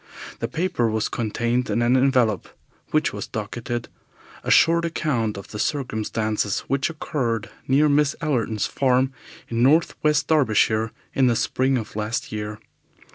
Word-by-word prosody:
The 115 - -1
paper 140 -4 0
was 110 0 -1
contained 120 +2 -1
in 120 - +1
an 120 +2 +3
envelope, 125 -6 +2 0.4
which - - +1
was - - -5
docketed, 120 -1 -4 0.6
"A - - -4
Short 170 +1 +5
Account 130 -10 -1
of 100 - -9
the 105 - -7
Circumstances 110 -6 -1
which 135 +2 -1
occurred 120 -9 -2 0.2
near 140 +3 +4
Miss 145 0 +3
Allerton's 115 -9 0
Farm 130 0 +1 0.3
in 115 0 -1
North 155 +7 +4
West 150 0 +2
Derbyshire 110 -6 +2 0.2
in 130 -1 +3
the 120 - +3
Spring 130 +3 +1
of 110 -3 -6
Last 120 +6 -3
Year." 105 0 -4
125 Hz, 145 wpm, -23 LUFS, 110-140 Hz, 0.6 s, Short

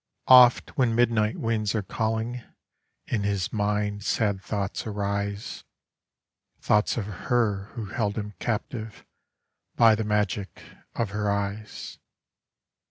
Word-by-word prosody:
Oft 125 -1 +7
when 120 -3 +3
midnight 115 -2 +2
winds 110 -2 -1
are 105 - 0
calling 115 +4 -2 0.6
in 110 - -1
his 100 -2 -1
mind 105 -1 -1
sad 100 -1 0
thoughts 100 +1 -3
arise, 100 0 -3 1.0
Thoughts 105 +2 +2
of 110 - -1
her 105 0 0
who 115 - -4
held 105 0 -2
him 105 -1 -4
captive 110 -1 -4 0.7
by 115 -2 +6
the 110 +1 0
magic 105 -1 -1 0.3
of 115 -4 -1
her 105 0 -1
eyes. 100 +1 -4
105 Hz, 115 wpm, -26 LUFS, 100-115 Hz, 1.0 s, Oft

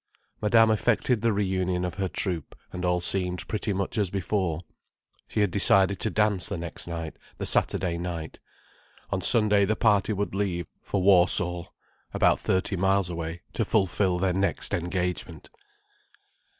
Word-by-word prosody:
Madame 110 +1 +5
effected 115 +1 +1
the 115 0 +2
reunion 95 -3 0
of 90 - -3
her 95 -1 -2
troupe, 85 -6 -3 0.2
and 90 - -5
all 90 0 +2
seemed 90 0 -2
pretty 105 -1 -2
much 100 +3 -2
as 100 -3 +1
before. 95 -3 -1 0.7
She 105 - -1
had 100 -3 +2
decided 100 0 +3
to 110 - 0
dance 105 -4 +1
the 100 - -3
next 85 0 -7
night, 85 -2 -5 0.2
the - - -4
Saturday 85 -3 +1
night. 85 -3 -5 0.7
On 95 -1 -1
Sunday 105 -1 +3
the 105 +3 +1
party 105 -2 +2
would 100 -1 -2
leave 95 -4 -1 0.2
for 95 -2 -2
Warsall, 90 -2 +3 0.5
about - - +3
thirty 95 +2 0
miles 95 0 +1
away, 85 0 -5
to 115 - 0
fulfil 95 -3 +1
their 90 0 +1
next 95 +2 -1
engagement. 90 -2 -3
95 Hz, 150 wpm, -26 LUFS, 90-100 Hz, 0.7 s, Madame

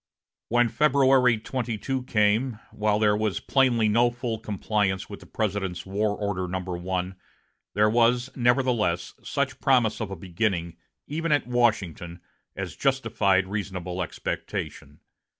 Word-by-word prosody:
When 120 +1 +4
February 130 -3 +4
22 125 +2 -3
came, 110 +2 +2
while 105 -1 +1
there 105 -1 +3
was 105 -2 -1
plainly 125 -5 +2
no 120 +3 +4
full 120 -2 -4
compliance 100 -3 -1
with 100 - -7
the - - -15
President's 100 -4 -2
War 105 +2 -1
Order 100 -3 -2
No. 90 -1 -4
I, 90 0 -1 0.6
there 105 +1 +4
was, 120 +3 +2
nevertheless, 120 -8 +1
such - - -2
promise 125 -5 +3
of 110 - -3
a 95 - -5
beginning, 90 -1 -2 0.3
even 165 +2 -2
at 145 -3 +3
Washington, 105 -8 0 0.4
as - - -5
justified 95 -1 +2
reasonable 95 -3 -4
expectation. 75 -4 -5
105 Hz, 130 wpm, -26 LUFS, 95-120 Hz, 0.6 s, When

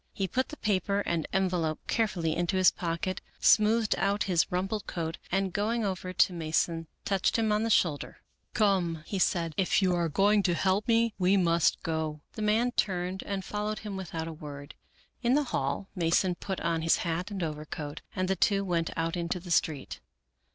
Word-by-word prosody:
He 195 - -1
put 260 +8 -1
the 305 - -8
paper 200 -1 0
and 170 -5 -1
envelope 180 -5 0
carefully 185 -9 0
into 175 +2 0
his 185 -1 +6
pocket, 175 +2 -3 0.2
smoothed 220 0 +4
out 200 +1 +1
his 175 -4 +1
rumpled 195 +4 -2
coat, 165 -2 -4
and 190 0 0
going 220 +2 0
over 185 -1 -3
to 185 0 +3
Mason 165 0 -1 0.2
touched 195 +2 +1
him 220 -1 +1
on 210 0 +2
the 225 - 0
shoulder. 160 -9 +1 0.2
" - - -48
Come," 180 -7 +1
he 195 - -3
said, 170 -3 +1
" - - -37
if 190 - +3
you 185 -2 +2
are 170 -1 +1
to 195 +2 +3
help 190 +5 +1
me 230 -1 +3
we 185 +2 +4
must 170 -3 +2
go," 160 -2 -2
The 220 - -6
man 220 +4 +2
turned 185 -4 -1
and 195 -2 -3
followed 210 +1 -3
him 205 -2 -4
without 170 -4 -4
a 165 - -5
word. 145 -2 -9 0.5
In 245 +1 +3
the 295 - +3
hall 140 +8 -1
Mason 175 +1 +2
put 190 +2 -5
on 165 -1 0
his 165 0 +3
hat 170 +4 -2
and 195 -3 -4
overcoat, 150 -1 -5
and 185 -1 0
the 190 - +1
two 200 +2 +2
went 170 -3 0
out 165 +1 -1
into 175 +1 -2
the 175 0 -9
street. 155 -3 0
185 Hz, 195 wpm, -29 LUFS, 165-205 Hz, 0.5 s, his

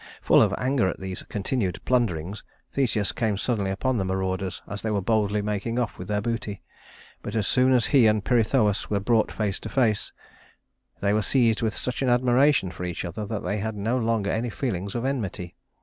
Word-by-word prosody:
Full - - +6
of - - +4
anger 130 -5 +1
at - - -3
these 95 -1 -5
continued 105 -2 -1
plunderings, 105 -6 0 0.3
Theseus 110 -8 0
came 110 -2 -1
suddenly 105 -3 -1
upon 120 +5 0
the - - 0
marauders 95 0 -2
as 100 - -6
they 110 - -2
were 105 -2 +1
boldly 105 0 +1
making 105 +3 -2
off 120 -3 -2
with 90 - -6
their 105 0 0
booty; 110 -3 -3 0.6
but - - -6
as 110 -3 +1
soon 130 +3 +3
as 125 -3 +4
he 130 -6 +5
and 105 -2 +2
Pirithous 115 -3 +2
were 100 - +1
brought 110 +2 +2
face 105 -3 -2
to - - -7
face, 115 -6 +1 0.9
they 100 0 +2
were 110 - +2
seized 115 0 +2
with 110 -2 0
such 125 +1 -3
an 130 - +2
admiration 125 -3 +3
for 90 - -7
each 90 0 -3
other 100 +5 -5
that 110 -1 -4
they 105 - -1
had 110 +1 -3
no 110 +4 -1
longer 115 -4 0
any 115 +2 -1
feelings 100 -5 -3
of 120 +1 -2
enmity. 100 -10 -3
110 Hz, 200 wpm, -25 LUFS, 100-120 Hz, 0.9 s, Full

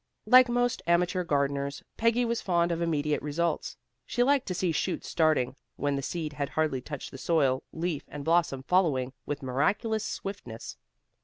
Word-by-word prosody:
Like 255 0 +7
most 245 0 +1
amateur 175 +1 +2
gardeners, 140 -2 -1
Peggy 230 +2 +2
was 235 0 -1
fond 175 -2 +1
of 170 0 -1
immediate 150 -3 0
results. 165 +3 -2 0.3
She 245 - +1
liked 275 0 +2
to 180 - -2
see 180 -1 +1
shoots 180 +3 -2
starting 155 -6 +2 0.2
when 145 0 0
the 140 - -2
seed 155 +2 -4
had 145 -2 -3
hardly 155 -5 0
touched 145 +1 -7
the 135 - -9
soil, 135 -5 +2
leaf 165 -2 -3
and 145 -1 -7
blossom 165 -5 +2
following 140 -8 +2
with 145 0 -3
miraculous 200 - 0
swiftness. 195 - -6
160 Hz, 165 wpm, -28 LUFS, 140-185 Hz, 0.3 s, Like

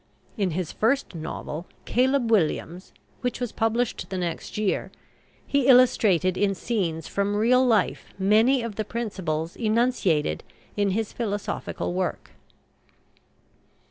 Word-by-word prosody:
In 200 -4 0
his 180 -4 -2
first 255 +3 0
novel, 160 0 -6 0.2
"Caleb 255 -1 +2
Williams," 180 -2 0 0.3
which 245 -2 -2
was 245 -3 -3
published 225 +1 -1
the 190 - -3
next 175 +1 -4
year, 210 -2 -1 0.5
he 280 -2 +1
illustrated 210 -8 +5
in 200 -1 +2
scenes 170 -8 -2
from 200 +1 -1
real 245 +5 +4
life 225 -6 +2
many 220 +6 +4
of 230 -3 -5
the 215 - 0
principles 185 -8 -3
enunciated 215 - +1 0.3
in 205 -1 +1
his 210 +2 -2
philosophical 205 -5 -3
work. 185 0 -3
210 Hz, 120 wpm, -25 LUFS, 185-235 Hz, 0.5 s, illustrated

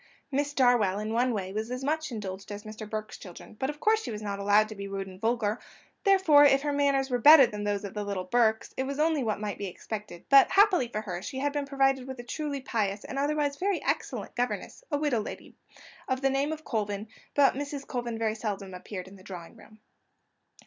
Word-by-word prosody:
Miss 285 +1 0
Darwell, 240 -7 +3
in 215 +1 -3
one 245 +2 +2
way, 195 -4 -3
was 220 +2 -3
as 250 +1 -4
much 310 +1 -1
indulged 200 -3 -6
as 205 0 -6
Mr. 215 0 -8
Burke's 215 0 -5
children, 185 +3 -11
but 265 - -1
of 295 0 -6
course 435 +5 +3
she - - -6
was 215 -1 -5
not 200 -1 -3
allowed 205 +2 +4
to 215 - -7
be 200 0 -6
rude 195 0 -4
and 190 0 -12
vulgar; 225 -1 0 0.5
therefore, 380 -7 +6
if 275 -1 +5
her 290 -1 0
manners 280 -2 +1
were 245 - +1
better 295 +1 +9
than 210 -2 -5
those 205 0 -1
of 200 - -6
the 210 - -3
little 200 -2 -3
Burkes, 220 +2 +1
it 265 - 0
was 280 0 -4
only 310 -1 +2
what 215 -5 -1
might 210 -1 -4
be 200 - -3
expected; 205 -1 -7
but, 275 -1 +7
happily 390 - +4
for 215 -2 -4
her, 180 -4 -5
she 265 +6 -6
had 285 +2 -1
been 290 -1 -2
provided 270 -1 +1
with 260 0 -6
a - - -6
truly 285 +2 -4
pious 210 -5 -2
and 275 - -4
otherwise 290 0 0
a - - -24
very 390 0 +1
excellent - - -2
governess, 245 - -3
a 290 - 0
widow 290 -5 +1
lady, - - -8 0.5
of 260 -1 -1
the 270 0 +2
name 275 +3 0
of 315 0 -5
Colvin; 210 -2 -2 0.3
but 280 -1 +5
Mrs. 285 0 -5
Colvin 240 -3 -4
seldom 205 -3 -4
appeared 185 0 -7
in 195 +1 -13
the 185 - -16
drawing 180 -3 -9
room. 215 0 -17
240 Hz, 230 wpm, -28 LUFS, 205-280 Hz, 0.5 s, better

